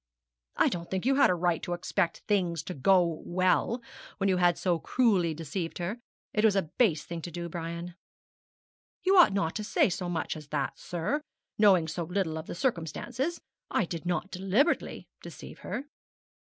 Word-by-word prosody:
'I - - +4
don't 170 -1 -5
think 190 +2 -2
you 270 - +4
had 280 +1 +5
a 180 - +3
right 175 -1 +1
to 175 - -3
expect 175 0 -1
things 180 -6 +1
to 180 - -5
go 175 +1 +3
well, 185 +7 +1 0.3
when 195 -1 +1
you 185 - +3
had 175 -1 +3
so 175 -3 +1
cruelly 190 -8 +2
deceived 165 +2 -4
her. 185 +7 -3 0.3
It 210 - +1
was 215 -3 +5
a 195 - +3 0.2
base 175 -12 +3
thing 170 -1 -5
to 175 - -6
do, 170 +1 -5
Brian.' 170 +1 -5 1.1
'You 380 +1 +4
ought 350 - +8
not 180 -5 0
to 215 - -4
say 205 - +2
so 180 0 -3
much 170 -2 -2
as 155 -2 -9
that, 145 -2 -2
sir, 180 - -2 0.4
knowing 190 -6 +5
so 170 +2 -3
little 175 -2 -1
of 160 - -9
the - - -5
circumstances. 260 - -2 0.3
I 210 - +1
did 170 0 -6
not 180 +2 -1
deliberately 195 - 0
deceive - - -10
her.' 265 - -5
180 Hz, 180 wpm, -29 LUFS, 170-200 Hz, 1.1 s, ought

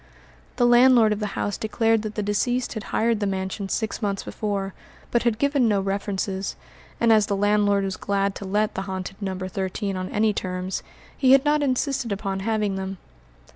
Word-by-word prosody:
The 245 - +3
landlord 240 -2 +6
of 210 - -5
the 210 -2 -4
house 205 - -2
declared 225 0 +1
that 215 -1 -5
the 210 - -1
deceased 245 +5 0
had 220 -3 -6
hired 230 -1 +1
the 205 - 0
mansion 190 +1 -3
six 220 +1 -2
months 200 -2 -1
before, 200 -2 -3 0.4
but 235 - +2
had 235 -2 +1
given 280 -1 +2
no 205 -2 +2
references, 195 0 -2 0.4
and 230 -1 +5
as 215 -2 +4
the 200 - 0
landlord 205 0 +2
was 190 -1 -3
glad 200 0 0
to 200 - -7
let 210 +2 0
the - - -3
haunted 190 0 -5
No. 190 -2 -3
13 190 +2 -3
on 185 0 -4
any 215 0 +2
terms, 185 0 -3 0.3
he 265 -2 +5
had 270 +1 +5
not 300 0 +3
insisted 270 -2 0
upon 195 -1 -2
having 210 -1 0
them. 190 0 -4
205 Hz, 190 wpm, -24 LUFS, 195-225 Hz, 0.4 s, landlord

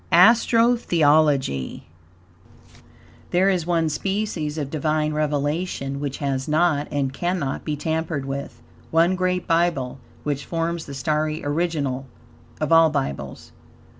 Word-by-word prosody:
ASTRO 230 +5 +5
THEOLOGY 145 - +2 1.5
There 190 +3 +3
is 175 -3 -1
one 165 -2 +2
species 160 -2 -2
of 145 -3 -3
Divine 155 0 0
revelation 145 -1 -1
which 140 -1 -3
has 135 -1 -2
not, 155 -1 +2
and 135 -2 -1
cannot, 175 -3 -2
be 150 - -2
tampered 160 -1 -2
with, 140 +1 -6 0.3
one 170 +3 +3
great 180 0 0
Bible, 165 -7 +1 0.2
which 145 -1 -2
forms 165 0 -2
the 140 - -7
starry 155 +3 -1
original 145 -4 -1 0.5
of 155 0 -2
all 165 -1 +7
Bibles. 135 - -4
155 Hz, 120 wpm, -23 LUFS, 140-170 Hz, 1.5 s, all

